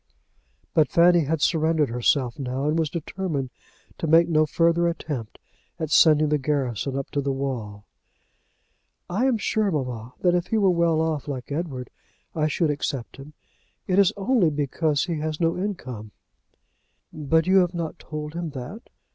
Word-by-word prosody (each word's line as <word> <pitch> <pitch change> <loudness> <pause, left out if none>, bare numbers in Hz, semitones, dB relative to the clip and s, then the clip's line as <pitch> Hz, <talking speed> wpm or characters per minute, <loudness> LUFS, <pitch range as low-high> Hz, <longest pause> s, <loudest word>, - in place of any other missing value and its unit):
But 155 -2 +3
Fanny 170 -1 +5
had 155 +1 -1
surrendered 160 -3 +2
herself 125 +1 0
now, 130 +1 -3
and 155 +2 +1
was 160 -2 0
determined 155 -4 -4 0.5
to 165 - -2
make 165 +2 +5
no 155 -2 +3
further 170 +2 +2
attempt 145 -9 -4 0.4
at 160 -3 -4
sending 155 -1 +5
the 150 0 +1
garrison 135 -2 -1
up 135 - -5
to 145 - 0
the 140 0 -1
wall. 120 -7 -4 1.3
"I 230 +9 +1
am 250 -4 +2
sure, 215 -1 0
mamma, 125 - -4
that 175 -1 +3
if 175 -1 0
he 225 - 0
were 195 -3 +4
well 170 -2 +2
off, 155 -4 -2
like 135 -1 -5
Edward, 140 -5 -4 0.4
I 155 -1 +1
should 155 +1 +1
accept 135 -4 -4
him. 140 +2 -11 0.5
It 185 +1 +2
is 195 -2 +5
only 205 -3 +2
because 145 0 0
he 170 -3 -3
has 155 0 -3
no 165 -1 +1
income." 130 - -5 1.0
"But 160 +2 +1
you 190 +1 +4
have 180 -1 +3
not 165 -2 -4
told 150 0 -6
him 170 -1 -4
that?" 190 - -8
155 Hz, 165 wpm, -24 LUFS, 140-170 Hz, 1.3 s, Fanny